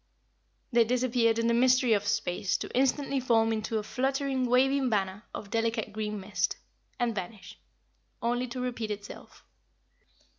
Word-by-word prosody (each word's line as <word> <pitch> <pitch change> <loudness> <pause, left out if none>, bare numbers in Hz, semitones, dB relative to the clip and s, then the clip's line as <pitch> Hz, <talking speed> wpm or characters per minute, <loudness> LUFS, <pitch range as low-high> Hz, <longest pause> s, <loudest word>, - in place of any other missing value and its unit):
They 235 -1 +5
disappeared 240 -1 +2
in 230 - 0
the 235 - +3
mystery 250 0 +4
of 205 -1 0
space 195 -4 0
to - - -7
instantly 275 +1 +1
form 225 -3 +2
into 220 +1 -2
a 215 - -2
fluttering, 265 +2 -1
waving 265 +2 +3
banner 200 -1 -1
of 200 - -8
delicate 225 -2 -1
green 210 -1 -3
mist 195 +2 -1 0.4
and 240 -2 +1
vanish; 195 0 -7 0.6
only 245 +2 0
to 250 +1 -6
repeat 245 -3 -3
itself. 205 -1 -8
230 Hz, 145 wpm, -29 LUFS, 215-255 Hz, 0.6 s, They